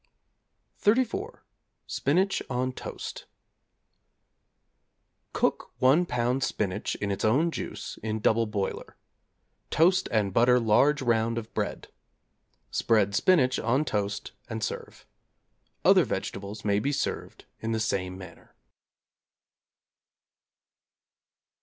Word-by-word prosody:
=34. 230 +3 +1 0.4
Spinach 185 +7 +1
on 130 0 -1
Toast= - - -7 2.1
Cook - - -1
1 145 +8 +4
lb. 125 +1 0
spinach 100 -7 -2
in 100 -1 -3
its 100 - -3
own 140 +10 +3
juice - - -6
in 110 0 -2
double 110 +1 +2
boiler. 100 -2 -4 0.7
Toast 185 +4 +3
and 105 -4 +1
butter 125 +3 +5
large 135 +6 +3
round 115 -1 +1
of 115 -1 -6
bread. - - -3 0.8
Spread 105 -3 +2
spinach 130 - +3
on 130 +7 +1
toast 105 -5 -2 0.2
and 110 -1 -4
serve. - - -5 0.8
Other - - +7
vegetables 100 +3 -5
may 100 -1 +2
be 140 +6 0
served 145 - -3
in 110 - -3
the 110 - 0
same 95 -4 -2
manner. 95 -1 -13
115 Hz, 105 wpm, -27 LUFS, 105-135 Hz, 2.1 s, Other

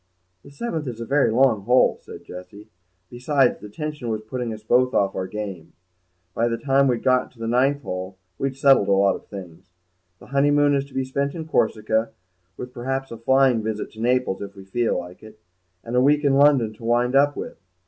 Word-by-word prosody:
"The - - -15
seventh 155 - -4
is 120 -2 -6
a 115 - -5
very 140 +4 +2
long 115 -2 +3
hole," 125 +5 +3
said - - -11
Jessie; 100 +4 -11 0.4
"besides, 130 +1 +1
the 105 - -10
tension 150 +1 -5
was 110 -1 -3
putting 120 +1 -4
us 110 -1 -8
both 125 +3 +2
off 100 -1 +2
our 95 -1 -3
game. 95 -6 -7 0.6
By 115 +4 +1
the 115 -1 -1
time 135 +1 +2
we'd 120 -3 0
got 130 -1 +2
to - - -26
the 115 - -4
ninth 135 +4 +1
hole 95 +1 -6 0.2
we'd 135 -1 -2
settled 135 -7 +4
lots 100 0 +2
of - - -40
things. 90 -2 -10 0.5
The - - -16
honeymoon 145 +1 +3
is 140 -1 0
to 140 - -18
be 130 0 -1
spent 140 +3 -2
in 160 -2 -6
Corsica, 110 -5 0 0.4
with 125 0 -8
perhaps 135 +2 -4
a 115 - -7
flying 130 -1 +3
visit 110 -1 -4
to 110 - -11
Naples 125 -4 0
if 100 0 -8
we 95 -1 -12
feel 115 +4 0
like 90 +1 -8
it, 110 0 -14 0.4
and 115 +1 -5
a 125 - +4
week 145 +3 +3
in 140 -1 +3
London 135 -6 +4
to 110 - -16
wind 120 +2 +1
up 145 +1 +4
with. - - -7
120 Hz, 210 wpm, -23 LUFS, 105-135 Hz, 0.6 s, settled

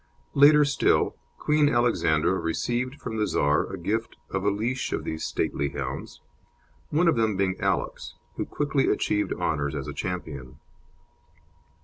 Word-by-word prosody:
Later 150 +1 +7
still, 145 - +2 0.2
Queen 150 -1 +3
Alexandra 120 - +2
received 120 - -1
from 110 -5 -5
the 105 -1 +1
Czar 75 +1 +1
a 95 - -5
gift 110 +6 -2
of 95 0 -2
a 100 - +3
leash 115 +6 -2
of - - -2
these 80 - -4
stately 70 0 -1
hounds, 70 -1 -6 0.7
one 165 +4 +2
of 165 - +4
them 110 -3 +1
being 95 -1 +1
Alex, - - -2 0.2
who - - -2
quickly 145 -2 0
achieved 105 0 0
honours 70 -1 -1
as - - -4
a - - -5
champion. 75 -8 -5
105 Hz, 145 wpm, -26 LUFS, 80-130 Hz, 0.7 s, Later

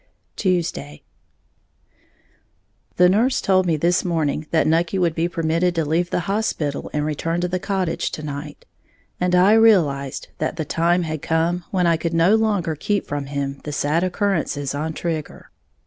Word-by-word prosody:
Tuesday. 165 - -2 1.9
The 180 - +5
nurse 225 +8 +2
told 185 -1 +2
me 165 -2 +2
this 175 +4 +2
morning 155 -3 -1
that 160 - +2
Nucky 165 +4 +1
would 175 -3 +1
be 165 +1 0
permitted 165 +1 0
to 165 -2 0
leave 170 +4 0
the - - -1
hospital 175 -7 -2
and 150 0 -1
return 165 +3 -2
to 180 - 0
the 180 +1 -2
cottage 185 -3 -1
to 155 - -5
night; 145 0 -7 0.5
and 180 0 +1
I 185 +4 +5
realized 165 - +3
that - - -2
the 160 -2 -3
time 170 +4 +1
had 155 -2 -4
come 165 +3 0
when 185 -2 +1
I 170 -1 +3
could 165 +1 -2
no 165 +5 +4
longer 205 -7 +1
keep 205 +7 -1
from 145 -1 -4
him 140 -1 -4
the 150 - -5
sad 150 +4 0
occurrences 175 -7 -1
on 155 +3 -3
Trigger. 160 -2 -5
165 Hz, 165 wpm, -21 LUFS, 150-180 Hz, 1.9 s, The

